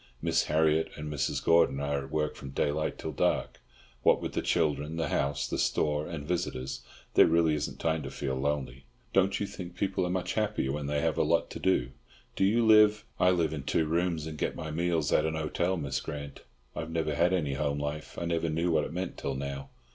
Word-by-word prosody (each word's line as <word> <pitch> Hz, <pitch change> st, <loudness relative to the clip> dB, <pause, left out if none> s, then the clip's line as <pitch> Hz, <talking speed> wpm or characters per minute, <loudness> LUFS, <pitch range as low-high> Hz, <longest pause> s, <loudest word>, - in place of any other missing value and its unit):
Miss 85 Hz, +2 st, +1 dB
Harriott 80 Hz, +1 st, +2 dB
and 75 Hz, 0 st, -5 dB
Mrs. 70 Hz, 0 st, -1 dB
Gordon 85 Hz, -4 st, +4 dB
are 70 Hz, -1 st, -1 dB
at -, -, -12 dB
work 75 Hz, 0 st, -1 dB
from 70 Hz, -, -8 dB
daylight 75 Hz, +3 st, -1 dB
till -, -, -4 dB
dark; -, -, 0 dB, 0.4 s
what -, -, +4 dB
with -, -, -5 dB
the -, -, 0 dB
children, 75 Hz, -1 st, 0 dB
the 80 Hz, -3 st, -1 dB
house, 70 Hz, 0 st, 0 dB
the -, -, -3 dB
store 75 Hz, 0 st, +1 dB
and 70 Hz, +1 st, -6 dB
visitors, 70 Hz, -7 st, -2 dB, 0.3 s
there -, -, +7 dB
really 80 Hz, -1 st, +3 dB
isn't 75 Hz, -1 st, -3 dB
time 80 Hz, -1 st, 0 dB
to 65 Hz, -, -5 dB
feel 65 Hz, 0 st, -3 dB
lonely. 65 Hz, -1 st, -2 dB, 0.3 s
Don't 95 Hz, 0 st, +3 dB
you 105 Hz, -, -1 dB
think 90 Hz, -3 st, -8 dB
people 95 Hz, +1 st, 0 dB
are 90 Hz, -, -1 dB
much 90 Hz, 0 st, -1 dB
happier 105 Hz, -11 st, 0 dB
when 75 Hz, 0 st, -3 dB
they 75 Hz, 0 st, 0 dB
have 80 Hz, -1 st, 0 dB
a -, -, +4 dB
lot 85 Hz, +2 st, +1 dB
to -, -, -6 dB
do? 65 Hz, -10 st, +1 dB, 0.4 s
Do -, -, +1 dB
you 115 Hz, +4 st, +3 dB
live—" 105 Hz, 0 st, +6 dB
"I 90 Hz, -, +5 dB
live 85 Hz, -4 st, +2 dB
in 75 Hz, -, -4 dB
two 80 Hz, +4 st, +1 dB
rooms 85 Hz, 0 st, 0 dB
and 80 Hz, -1 st, -7 dB
get -, -, -1 dB
my 80 Hz, -1 st, -5 dB
meals 85 Hz, -1 st, 0 dB
at 75 Hz, -, +4 dB
an 80 Hz, 0 st, -1 dB
hotel, 85 Hz, +4 st, 0 dB
Miss 70 Hz, -4 st, -2 dB
Grant. 70 Hz, -2 st, -7 dB, 0.3 s
I -, -, -4 dB
have 80 Hz, +1 st, -4 dB
never 80 Hz, -2 st, -1 dB
had 85 Hz, +4 st, +3 dB
any 80 Hz, -7 st, 0 dB
home 70 Hz, +1 st, -1 dB
life. 75 Hz, +1 st, -5 dB
I 85 Hz, -, -3 dB
never 85 Hz, -1 st, 0 dB
knew 85 Hz, +3 st, 0 dB
what 80 Hz, -2 st, +2 dB
it -, -, -7 dB
meant 90 Hz, +1 st, -4 dB
till 70 Hz, -, -2 dB
now." 70 Hz, 0 st, -5 dB
80 Hz, 225 wpm, -29 LUFS, 70-85 Hz, 0.4 s, there